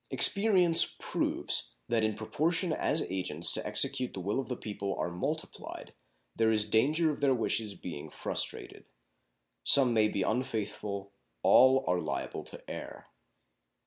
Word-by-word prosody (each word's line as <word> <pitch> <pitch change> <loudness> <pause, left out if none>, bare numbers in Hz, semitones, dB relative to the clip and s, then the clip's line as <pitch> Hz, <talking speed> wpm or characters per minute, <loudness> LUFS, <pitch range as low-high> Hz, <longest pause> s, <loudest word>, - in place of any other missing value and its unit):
Experience 185 -5 +5
proves - - 0
that 115 -2 0
in 110 -1 0
proportion 160 - -2
as 155 - 0
agents 90 -3 +1
to - - -2
execute 125 -1 -1
the - - -6
will 100 +7 -2
of 135 - -5
the 125 - -5
people 100 -2 -5
are 85 - -3
multiplied 90 - -6 0.4
there 110 -1 +2
is 105 -1 +1
danger 150 +9 +2
of 145 - -8
their 135 -2 +2
wishes 110 -3 -1
being 85 -4 -8
frustrated. - - -4 0.8
Some 130 -4 +6
may 110 -1 +3
be 100 -2 -2
unfaithful; 105 -3 -4 0.3
all 130 +1 +5
are 90 0 0
liable 75 -4 -5
to - - -13
err. - - -9
110 Hz, 145 wpm, -29 LUFS, 100-135 Hz, 0.8 s, Some